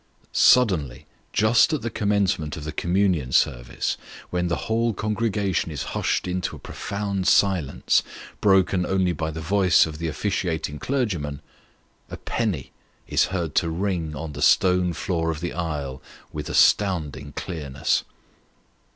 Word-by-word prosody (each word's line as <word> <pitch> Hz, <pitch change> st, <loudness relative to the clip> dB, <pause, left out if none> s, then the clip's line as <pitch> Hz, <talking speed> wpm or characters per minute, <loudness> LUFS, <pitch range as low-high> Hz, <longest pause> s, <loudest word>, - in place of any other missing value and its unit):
Suddenly, 90 Hz, -, +3 dB, 0.3 s
just 115 Hz, +8 st, +4 dB
at 150 Hz, -, -2 dB
the 115 Hz, -, -2 dB
commencement 100 Hz, -8 st, 0 dB
of 75 Hz, -, -7 dB
the 75 Hz, -, -4 dB
communion 85 Hz, -6 st, 0 dB
service, -, -, 0 dB, 0.3 s
when 90 Hz, 0 st, 0 dB
the 85 Hz, -, -2 dB
whole 115 Hz, +1 st, +1 dB
congregation 105 Hz, -4 st, -1 dB
is 75 Hz, -1 st, -4 dB
hushed -, -, 0 dB
into 90 Hz, 0 st, -2 dB
a -, -, -11 dB
profound 100 Hz, -2 st, -3 dB
silence, 90 Hz, -8 st, +3 dB, 0.4 s
broken 95 Hz, -2 st, +3 dB
only 95 Hz, 0 st, +1 dB
by 80 Hz, -1 st, -3 dB
the 80 Hz, +1 st, -6 dB
voice 95 Hz, +1 st, +4 dB
of 80 Hz, -1 st, -7 dB
the 85 Hz, -, -2 dB
officiating 80 Hz, -4 st, -2 dB
clergyman, 90 Hz, -, -2 dB, 0.7 s
a -, -, -7 dB
penny 100 Hz, -, -2 dB, 0.4 s
is -, -, +3 dB
heard 85 Hz, -5 st, -3 dB
to 85 Hz, -, +2 dB
ring 85 Hz, -3 st, -2 dB
on 75 Hz, +2 st, -5 dB
the 75 Hz, -, -7 dB
stone 90 Hz, +1 st, +4 dB
floor 80 Hz, -1 st, -1 dB
of 80 Hz, -1 st, -2 dB
the 85 Hz, +1 st, -4 dB
aisle 75 Hz, -6 st, -4 dB, 0.3 s
with 75 Hz, -1 st, -5 dB
astounding 75 Hz, -8 st, +2 dB
clearness. 75 Hz, -7 st, -2 dB
90 Hz, 140 wpm, -24 LUFS, 75-100 Hz, 0.7 s, just